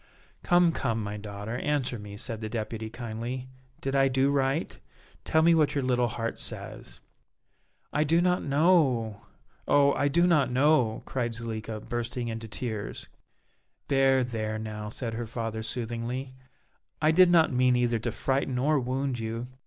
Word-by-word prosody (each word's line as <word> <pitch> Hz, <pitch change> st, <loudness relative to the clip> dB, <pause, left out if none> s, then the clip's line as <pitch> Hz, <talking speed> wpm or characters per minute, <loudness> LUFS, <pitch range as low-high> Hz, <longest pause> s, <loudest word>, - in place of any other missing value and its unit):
"Come, 175 Hz, -1 st, +4 dB
come, 115 Hz, -7 st, -1 dB
my 105 Hz, 0 st, -4 dB
daughter, 105 Hz, +2 st, -6 dB
answer 135 Hz, -5 st, -1 dB
me," 105 Hz, 0 st, -9 dB
said 110 Hz, +1 st, -5 dB
the 110 Hz, -, -4 dB
Deputy, 110 Hz, 0 st, -4 dB
kindly, 120 Hz, +3 st, -5 dB, 0.3 s
"did 135 Hz, 0 st, -2 dB
I 135 Hz, 0 st, +5 dB
do 135 Hz, +1 st, +2 dB
right? 140 Hz, +3 st, 0 dB, 0.4 s
Tell 160 Hz, 0 st, +3 dB
me 170 Hz, +1 st, +6 dB
what 150 Hz, -3 st, +3 dB
your 140 Hz, -, 0 dB
little 125 Hz, -1 st, +2 dB
heart 115 Hz, +1 st, -4 dB
says." -, -, -7 dB, 0.9 s
"I 150 Hz, -, +3 dB
do 165 Hz, +3 st, +3 dB
not 180 Hz, +1 st, +2 dB
know, 140 Hz, -, +2 dB, 0.4 s
oh! 140 Hz, -1 st, +5 dB
I 145 Hz, -, +1 dB
do 170 Hz, +5 st, +3 dB
not 150 Hz, -8 st, +3 dB
know!" 130 Hz, -3 st, +2 dB
cried 120 Hz, -3 st, -2 dB
Zuleika, 110 Hz, -1 st, -5 dB
bursting 120 Hz, +1 st, -3 dB
into 115 Hz, 0 st, -5 dB
tears. 110 Hz, -1 st, -5 dB, 0.8 s
"There, 135 Hz, -1 st, +4 dB
there 110 Hz, -3 st, -3 dB
now," 105 Hz, -1 st, -5 dB
said 115 Hz, +1 st, -4 dB
her 115 Hz, 0 st, -4 dB
father, 115 Hz, -1 st, -4 dB
soothingly; 120 Hz, +3 st, -4 dB, 0.7 s
"I 155 Hz, +1 st, +4 dB
did 180 Hz, +2 st, +6 dB
not 165 Hz, -4 st, +4 dB
mean 125 Hz, 0 st, +4 dB
either 120 Hz, -2 st, +1 dB
to 120 Hz, +2 st, -2 dB
frighten 135 Hz, +3 st, -1 dB
or 145 Hz, +3 st, +2 dB
wound 130 Hz, 0 st, -2 dB
you. 115 Hz, +2 st, -4 dB
125 Hz, 160 wpm, -28 LUFS, 115-140 Hz, 0.9 s, me